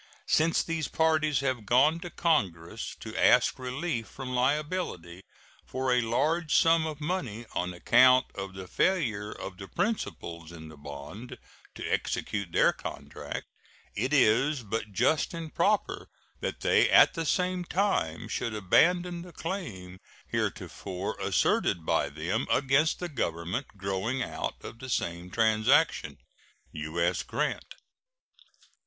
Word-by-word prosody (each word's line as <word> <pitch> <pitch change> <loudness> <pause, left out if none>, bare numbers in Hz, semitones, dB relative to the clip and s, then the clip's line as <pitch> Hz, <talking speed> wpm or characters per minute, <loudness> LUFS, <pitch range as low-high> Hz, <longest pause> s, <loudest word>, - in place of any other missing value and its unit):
Since 160 +1 +3
these 165 -3 -2
parties 155 -3 +2
have 130 -4 -1
gone 145 +7 +4
to 175 0 -7
Congress 100 - -1
to - - -7
ask - - +4
relief 125 -1 -3
from 130 - -7
liability 130 - -1 0.4
for 130 -1 -1
a 125 - +3
large 150 +8 +1
sum 165 -1 +4
of 155 -2 -6
money 140 - -3
on 90 +1 -1
account 125 +8 +5
of 95 -1 -6
the 95 -1 -7
failure 110 - 0
of 95 -1 -8
the 95 - -7
principals 85 - -3
in 80 -2 -10
the 80 - -12
bond 75 - -9 0.4
to - - -5
execute 100 -5 -2
their - - +4
contract, - - -7 0.5
it 130 +6 -1
is 135 +1 +3
but 110 0 -4
just 155 - +1
and 165 -2 -6
proper 215 - +1 0.3
that - - -4
they - - +4
at - - +7
the 165 - -2
same 180 +2 0
time 175 - 0
should 115 -2 -3
abandon 175 - +3
the 175 0 -11
claim 100 - -6 0.3
heretofore 95 0 -3
asserted 85 -2 +1
by - - +1
them - - -2
against 135 +3 +3
the 180 - -4
Government 95 - -2
growing 100 +7 -1
out - - -4
of 115 - -9
the 130 - -8
same 85 -5 -2
transaction. 110 +1 +2 0.5
U.S. 85 +3 -1
GRANT. - - -3
125 Hz, 135 wpm, -29 LUFS, -, 0.5 s, at